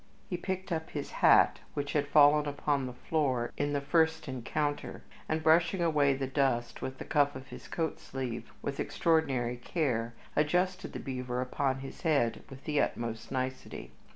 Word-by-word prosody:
He 185 - -3
picked 190 +1 -4
up 160 -1 -2
his 145 -2 -5
hat, - - +6 0.2
which 145 0 -2
had 145 -1 +1
fallen 145 +1 +6
upon 145 -1 0
the 125 - -6
floor 130 -3 0
in 145 0 -1
the 145 - +1
first 160 +2 +2
encounter, 145 +3 -3 0.3
and, 155 0 0
brushing 165 +3 +4
away 150 -5 +3
the 135 0 -2
dust 130 -3 0
with 130 0 -4
the - - -7
cuff 145 -2 +2
of 130 +1 -9
his - - -10
coat 160 -2 -2
sleeve 130 -3 -5
with - - -3
extraordinary 135 -7 +1
care, 120 -4 -1 0.2
adjusted 180 +5 +1
the - - -4
beaver 125 -2 -3
upon 130 +1 -1
his 135 - -9
head 140 -9 +1
with 135 0 -11
the 150 -2 +1
utmost 115 -1 -3
nicety. 130 0 -4
145 Hz, 170 wpm, -31 LUFS, 130-160 Hz, 0.3 s, hat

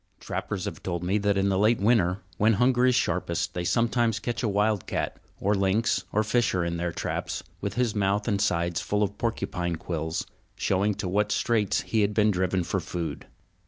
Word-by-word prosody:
Trappers - - -4
have - - -5
told 85 -2 -3
me 95 +4 +1
that 100 -1 +1
in 100 0 +2
the 95 -1 +1
late 110 +3 +4
winter, 100 -3 +2 0.2
when 110 +2 +4
hunger 125 +3 +3
is 125 - +4
sharpest, 85 -4 0
they 90 - -2
sometimes 115 +4 +2
catch 120 +2 -3
a 115 - 0
wild 105 -1 +1
cat - - -2 0.2
or 100 - +1
lynx 100 +3 +1
or 110 - +2
fisher 105 -6 +1
in 85 0 -2
their 85 0 -1
traps - - -3 0.2
with 100 -1 -3
his 120 -3 +1
mouth 100 +1 0
and 100 -3 +1
sides 85 -3 +1
full 105 +4 0
of 100 0 -3
porcupine 90 -7 -2
quills, 80 -1 -3 0.3
showing 100 +2 +1
to 95 - -4
what 105 +3 +1
straits 110 -4 +1
he 110 - 0
had 105 0 +1
been 110 -1 +4
driven 95 -1 0
for - - -1
food. 85 -2 -5
100 Hz, 195 wpm, -27 LUFS, 90-110 Hz, 0.3 s, late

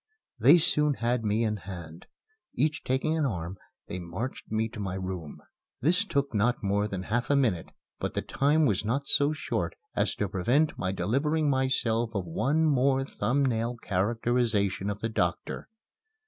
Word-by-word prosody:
They 135 +10 +8
soon 150 -3 +2
had 120 0 0
me 110 +2 +1
in 105 -1 0
hand. 85 -3 -9 0.5
Each 150 0 0
taking 135 +5 0
an 155 -3 +1
arm, 90 -3 -4 0.3
they 90 - -5
marched 90 +11 -6
me 110 +1 +1
to 110 - -9
my 95 -2 -3
room. 95 -5 -6 0.4
This 175 - +3
took 140 - -1
not 115 +3 +1
more 100 +1 +1
than 95 -3 -4
half 120 +5 -1
a 145 - +4
minute, 115 -12 +1 0.3
but - - -3
the - - -1
time 150 +3 +2
was 100 -7 +1
not 130 +6 -1
so 145 +1 +4
short 155 - -2 0.2
as - - +1
to 105 - -1
prevent 120 - +1
my 95 - -2
delivering 145 +9 +1
myself 120 -4 0
of 95 -3 -1
one 140 - +1
more 135 -2 +3
thumb 140 +1 0
nail 120 -1 -1
characterization 105 -1 0
of 105 0 -4
the 115 - -1
doctor. 90 -6 -2
115 Hz, 170 wpm, -28 LUFS, 100-140 Hz, 0.5 s, They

